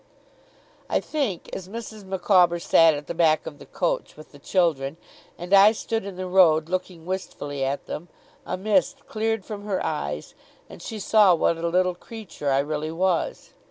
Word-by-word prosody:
I - - +2
think, 270 - -3
as 185 0 -6
Mrs. 220 -1 -8
Micawber 185 -2 +3
sat 165 -2 +5
at 145 0 -7
the - - -5
back 160 -2 +2
of 145 - -8
the - - -13
coach, - - -2
with 155 - -13
the 145 - -15
children, 155 -4 0 0.4
and 175 +3 -5
I 200 +2 +8
stood 225 -1 -3
in 200 -2 -7
the 185 0 -5
road 170 -4 +4
looking 180 -2 -4
wistfully 145 -6 -4
at 135 +1 -2
them, 170 - -6 0.4
a 180 - -4
mist 270 +8 0
cleared 225 -2 -2
from 205 -2 -7
her 200 -3 -1
eyes, 75 - -4 0.3
and - - -12
she 225 - -6
saw 210 -2 +5
what 165 0 +1
a 170 - -1
little 180 +1 +2
creature 180 -6 -7
I 135 - +3
really 155 +2 -3
was. 180 +1 -1
180 Hz, 180 wpm, -24 LUFS, 160-200 Hz, 0.4 s, I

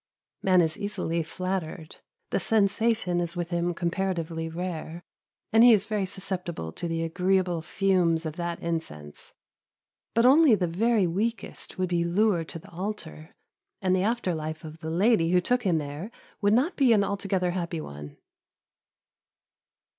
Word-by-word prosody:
Man 185 -2 +4
is 160 +3 0
easily 185 -5 -2
flattered, 165 -1 -4 0.3
the - - +1
sensation 220 -3 +1
is 170 0 -4
with 175 0 -4
him 175 0 0
comparatively 170 -2 -2
rare, 170 0 -5 0.5
and 225 +1 +7
he 240 -1 +9
is 205 -3 +3
very 210 -3 -1
susceptible 180 - -4
to 170 - -4
the 165 0 -2
agreeable 180 0 +1
fumes 175 -2 +1
of 155 -1 -4
that 170 -1 -3
incense; 75 - -5 0.8
but 230 +1 +4
only 275 -1 +7
the 185 -3 0
very 210 +4 +2
weakest 210 +7 -3
would 185 -1 -1
be 170 -1 +1
lured 175 -1 +1
to - - -6
the 200 +5 -14
altar, 170 -4 -6 0.4
and 185 -1 +2
the 185 - +1
after 215 -3 0
life 155 0 -5
of 160 0 -9
the 160 -1 -5
lady 180 0 +3
who 180 +1 +4
took 245 +7 +1
him 185 -7 +1
there 150 +6 -5 0.3
would 205 0 +3
not 270 - +2
be 260 -5 +4
an 205 -2 +4
altogether 195 -2 -1
happy 170 -2 -3
one. 75 - -9
180 Hz, 155 wpm, -27 LUFS, 165-200 Hz, 0.8 s, he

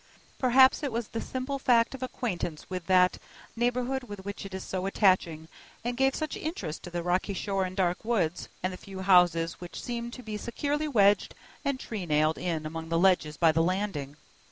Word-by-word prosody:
Perhaps 260 +2 +5
it 285 -3 -2
was 230 -1 -3
the 225 - -4
simple 260 +2 -4
fact 240 -2 +3
of 265 - -8
acquaintance 180 -11 -4
with 180 -2 -4
that 185 -1 +4 0.4
neighborhood 245 +2 0
which 200 -2 -7
made 195 -1 -7
it - - -3
so 190 0 -3
attaching, 185 -6 +2 0.4
and 240 +1 -2
gave 270 +1 +2
such 310 -1 -3
interest 205 - -4
to - - -8
the 175 0 -3
rocky 185 +3 0
shore 195 0 -1
and 185 +1 -7
dark 180 -2 +1
woods, 195 -8 0
and 185 0 -1
the - - -7
few 190 0 -9
houses 175 -3 +4
which 175 - -7
seemed 235 -1 -4
to 255 - -9
be 215 -2 -4
securely 290 +7 -2
wedged 205 -7 +3 0.3
and 280 -2 -1
tree 205 -8 -5
nailed 155 +1 +2
in 165 -3 -2
among 165 +1 -5
the 165 - +1
ledges 170 -4 +3
by 165 -2 +5
the 165 +1 +2
Landing. 165 -6 -2
195 Hz, 195 wpm, -28 LUFS, 175-240 Hz, 0.4 s, Perhaps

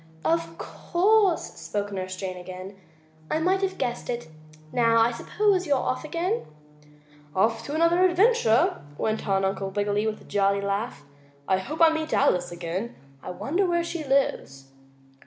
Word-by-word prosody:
"Of 165 +1 0
course," 390 +1 +2 0.2
spoke 205 0 -3
Nurse 185 -1 -4
Jane 185 -1 -5
again, 185 +2 -8 0.5
"I - - +1
might 370 +4 +1
have 385 -1 -1
guessed 240 - -3
it. 240 -8 -4 0.4
Now 230 -1 +3
I 230 +1 +4
suppose 380 - 0
you're 285 -2 +3
off 255 - -2
again?" 345 +8 -1 0.9
"Off 225 +4 +2
to 285 - -5
have - - -2
another 335 +3 +4
adventure," 370 - +3 0.2
went 220 0 -2
on 195 -1 +2
Uncle 195 0 -2
Wiggily, 205 +2 0
with 215 -1 -3
a - - -16
jolly 200 0 +1
laugh. 200 -6 -3 0.4
"I 190 -1 +2
hope 295 - -5
I 325 -1 +7
meet 315 0 -1
Alice 180 -11 +2
again. 175 +6 -4 0.3
I - - -8
wonder 340 - -1
where 345 -1 +1
she 335 -1 -4
lives?" 135 - -1
230 Hz, 160 wpm, -26 LUFS, -, 0.9 s, I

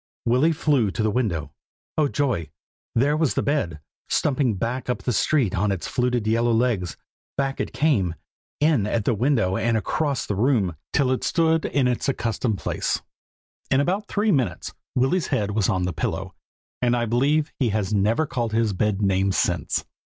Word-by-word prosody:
Willy 130 +8 +3
flew 145 -8 +2
to 110 - -2
the 110 - +2
window. 85 - -1 0.4
Oh 155 -2 +3
joy! 130 - -1 0.5
there 140 +5 +3
was 155 -3 +1
the - - +1
bed, 110 - -1 0.3
stumping 130 -6 +1
back 120 +6 -3
up 125 - -2
the 125 - 0
street 125 -5 +2
on 100 +3 +1
its 95 -3 -3
fluted 125 -2 0
yellow 115 +2 +2
legs. 110 -8 0 0.4
Back 135 0 -1
it - - -2
came, 105 - +1 0.4
in 145 -9 +3
at 110 -1 -1
the - - +3
window 115 -5 +1
and 115 0 +1
across 140 +4 -1
the - - -2
room, 105 - +1 0.2
till 135 -3 +2
it 130 - -1
stood 165 -2 +2
in 135 -3 +1
its 125 +3 0
accustomed 115 -4 -1
place. - - -1 0.7
In 135 - +3
about 190 +8 0
three 210 +1 +1
minutes 125 - -1 0.2
Willy's 135 +6 +2
head 105 -1 0
was 105 -1 +1
on 95 -1 +1
the 90 -1 -1
pillow, - - -3 0.5
and 120 -1 +2
I 120 - 0
believe 145 +7 +1
he 125 -4 +2
has 105 -1 -1
never 105 +9 +2
called 120 -5 -2
his 110 -2 +1
bed 105 +1 0
names 95 0 +2
since." - - 0
120 Hz, 180 wpm, -24 LUFS, 105-140 Hz, 0.7 s, Willy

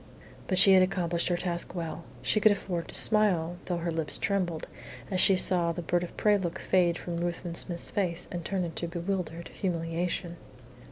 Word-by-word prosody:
But 185 - 0
she 195 +1 +8
had 190 - +7
accomplished 175 -2 0
her 175 - +1
task 175 0 -4
well. 165 -1 -5 0.2
She 215 - +2
could 215 +1 +5
afford 180 -4 -3
to - - -7
smile, 180 -6 +2
though 175 - -2
her 170 0 -2
lips 160 -1 -1
trembled, 180 -5 -1 0.5
as 185 - +4
she 195 - +7
saw 180 -2 +3
the 170 +1 -5
bird 175 +2 0
of 175 - -8
prey 210 -1 +3
look 175 -3 -3
fade 175 -2 +2
from 170 -1 -5
Ruthven 175 0 -3
Smith's 170 0 -2
face 180 -3 -1
and 175 -1 -5
turn 190 +1 -2
into 170 0 -4
bewildered 170 -1 -4
humiliation. 170 -1 -3
175 Hz, 185 wpm, -28 LUFS, 170-185 Hz, 0.5 s, she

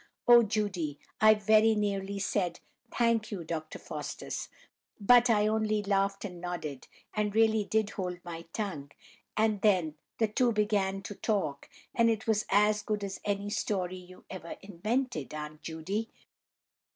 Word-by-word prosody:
Oh, 240 0 +9
Judy, 200 -9 -1 0.2
I 215 0 +8
very 215 +1 +4
nearly 200 -1 -1
said 190 -3 -1 0.3
'Thank 230 -2 +1
you, 195 -5 -5
Dr. 155 -1 -5
Faustus,' - - -6 0.5
but 245 +4 +6
I 210 -2 +4
only 215 -1 +1
laughed 195 0 0
and 180 -3 -7
nodded, 170 -6 -5 0.3
and 210 -1 -1
really 220 -1 +4
did 215 0 0
hold 180 -2 -4
my 165 -1 -7
tongue; 175 -10 -4 0.5
and 215 -2 +2
then 180 -7 +3 0.2
the 225 - +2
two 235 +2 +2
began 200 -2 +1
to 205 - -6
talk, 185 -10 -2 0.2
and 230 -1 +4
it 220 -1 -1
was 215 -2 +1
as 210 +1 +4
good 210 -1 -2
as 195 -1 -5
any 205 0 -2
story 185 -4 -1
you 180 0 -14
ever 175 -3 -7
invented, 215 - -2
Aunt 150 0 -7
Judy. 190 +8 -3
205 Hz, 150 wpm, -30 LUFS, 180-215 Hz, 0.5 s, Oh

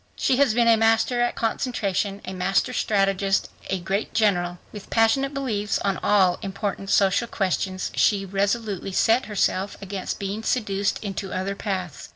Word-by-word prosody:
She 255 - +1
has 270 -5 +3
been 235 -1 +3
a 230 -1 +6
master 225 +2 +2
at 240 - +1
concentration, 205 -4 -1
a 185 - -5
master 195 +6 0
strategist 195 -3 +1 0.2
a 190 - 0
great 195 +4 -3
general. 180 -5 +1
With 210 -2 -10
passionate 250 +5 +2
beliefs 225 -8 -1
on 195 -2 -1
all 190 -4 +3
important 195 -1 -4
social 200 +4 +3
questions, 185 -2 -2
she 200 -2 +2
resolutely 200 0 -1
set 230 +6 +3
herself 200 -1 -1
against 195 -1 -5
being 200 +2 -4
seduced 205 -4 0
into 195 -1 -4
other 190 +2 -2
paths. 190 - -5
200 Hz, 155 wpm, -24 LUFS, 195-225 Hz, 0.2 s, a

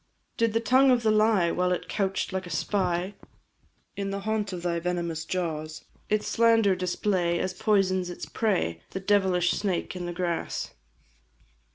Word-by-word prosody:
Did 230 -2 +1
the 225 - +2
tongue 260 +4 +4
of 245 -2 +3
the 220 - +3
lie, 215 -5 +3
while 180 0 0
it 180 - -2
couch'd 195 -1 -1
like 185 -1 -3
a - - -9
spy 185 -1 -1 0.8
In 200 -1 -3
the 200 0 -3
haunt 210 -1 -1
of 175 -2 -6
thy 170 -1 0
venomous 170 -2 -2
jaws, 155 -4 -4 0.2
Its 210 0 0
slander 225 -4 +4
display, 180 -1 0
as 185 +2 -2
poisons 185 -2 +1
its 175 - -6
prey 175 - -1
The - - -2
devilish 190 -3 +2
snake 190 -3 -2
in 175 -1 -4
the - - -3
grass? 170 -1 -3
185 Hz, 165 wpm, -27 LUFS, 175-210 Hz, 0.8 s, tongue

